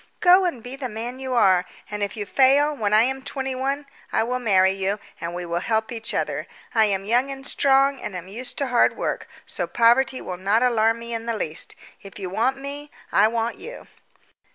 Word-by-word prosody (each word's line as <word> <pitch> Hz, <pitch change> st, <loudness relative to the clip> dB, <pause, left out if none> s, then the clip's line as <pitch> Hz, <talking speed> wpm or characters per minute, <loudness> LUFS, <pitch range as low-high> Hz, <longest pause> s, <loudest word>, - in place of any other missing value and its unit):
Go 365 Hz, +1 st, +6 dB
and 260 Hz, -11 st, -2 dB
be 250 Hz, +2 st, -7 dB
the 270 Hz, -2 st, -5 dB
man 235 Hz, +4 st, -6 dB
you 260 Hz, -1 st, -3 dB
are; 190 Hz, -6 st, +4 dB, 0.3 s
and 210 Hz, 0 st, -4 dB
if 205 Hz, +2 st, -2 dB
you 205 Hz, -, -3 dB
fail, 280 Hz, +6 st, +4 dB
when 210 Hz, -6 st, -1 dB
I 215 Hz, +1 st, +6 dB
am 265 Hz, +2 st, -1 dB
twenty 265 Hz, -1 st, -4 dB
one 275 Hz, +3 st, -2 dB, 0.3 s
I -, -, +2 dB
will 250 Hz, +2 st, -2 dB
marry 190 Hz, -5 st, +4 dB
you, 195 Hz, +1 st, -1 dB, 0.2 s
and 170 Hz, +1 st, -5 dB
we 175 Hz, 0 st, -4 dB
will 170 Hz, 0 st, -1 dB
help 220 Hz, +4 st, -1 dB
each 225 Hz, -1 st, -4 dB
other. -, -, -2 dB, 0.3 s
I 220 Hz, -1 st, +5 dB
am 195 Hz, -2 st, -1 dB
young 245 Hz, +5 st, +2 dB
and 270 Hz, 0 st, -7 dB
strong, 275 Hz, 0 st, +3 dB
and 210 Hz, -, -5 dB
am 180 Hz, 0 st, -6 dB
used 235 Hz, +6 st, -5 dB
to 280 Hz, -3 st, -1 dB
hard 245 Hz, -1 st, +3 dB
work, -, -, -3 dB, 0.2 s
so -, -, -3 dB
poverty 240 Hz, +3 st, +3 dB
will 180 Hz, -, -6 dB
not 200 Hz, +6 st, +2 dB
alarm 225 Hz, -2 st, +3 dB
me 235 Hz, 0 st, -7 dB
in 230 Hz, 0 st, -4 dB
the 230 Hz, -1 st, -1 dB
least. 155 Hz, -5 st, -3 dB, 0.3 s
If 195 Hz, -1 st, -11 dB
you 190 Hz, -3 st, -5 dB
want 250 Hz, +7 st, +1 dB
me, 285 Hz, +2 st, -7 dB, 0.2 s
I 205 Hz, +2 st, +5 dB
want 230 Hz, +1 st, -2 dB
you. -, -, -9 dB
235 Hz, 220 wpm, -23 LUFS, 205-265 Hz, 0.3 s, Go